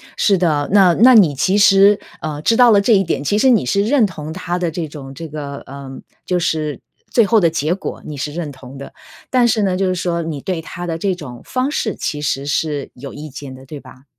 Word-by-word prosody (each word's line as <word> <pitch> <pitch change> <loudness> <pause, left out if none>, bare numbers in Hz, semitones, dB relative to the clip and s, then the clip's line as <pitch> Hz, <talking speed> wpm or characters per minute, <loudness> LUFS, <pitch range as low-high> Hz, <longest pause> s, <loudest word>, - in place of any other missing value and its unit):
是 200 -3 +2
的， 155 -5 0
那 190 -3 +5
那 250 +7 +6
你 180 - +5
其 185 +9 +1
实， 200 0 +5 0.2
呃， 150 -1 -5
知 225 +8 +2
道 245 -1 +6
了 205 - +5
这 220 +3 +3
一 195 - +3
点， 170 - -2
其 205 +9 0
实 265 +4 +4
你 225 - +3
是 200 +10 +1
认 240 +1 +3
同 155 -5 -6
他 175 0 -4
的 175 -2 -2
这 165 -1 -4
种 140 -2 -10
这 165 +4 -8
个， 145 -2 -7
呃， 140 0 -9 0.4
就 180 -1 0
是 155 -3 -2 0.3
最 230 - +4
后 225 +3 +3
的 170 - +4
结 160 +1 -1
果， 195 - -7
你 150 - -7
是 145 +2 -4
认 160 -2 -5
同 130 0 -12
的。 140 - -10 0.4
但 250 -2 +3
是 225 -2 +2
呢， 190 -2 +1
就 190 0 0
是 185 - -1
说 170 -1 -2
你 160 -3 -5
对 170 +3 -3
他 175 +2 -7
的 165 - -3
这 190 +3 -1
种 135 -9 -9
方 255 +2 -2
式 220 - -2
其 150 - -3
实 140 -1 -2
是 145 -1 -2
有 135 +2 -9
意 150 +1 -8
见 135 0 -9
的， 130 0 -13
对 150 +3 -9
吧？ 135 +2 -16
165 Hz, 260 characters per minute, -18 LUFS, 145-200 Hz, 0.4 s, 那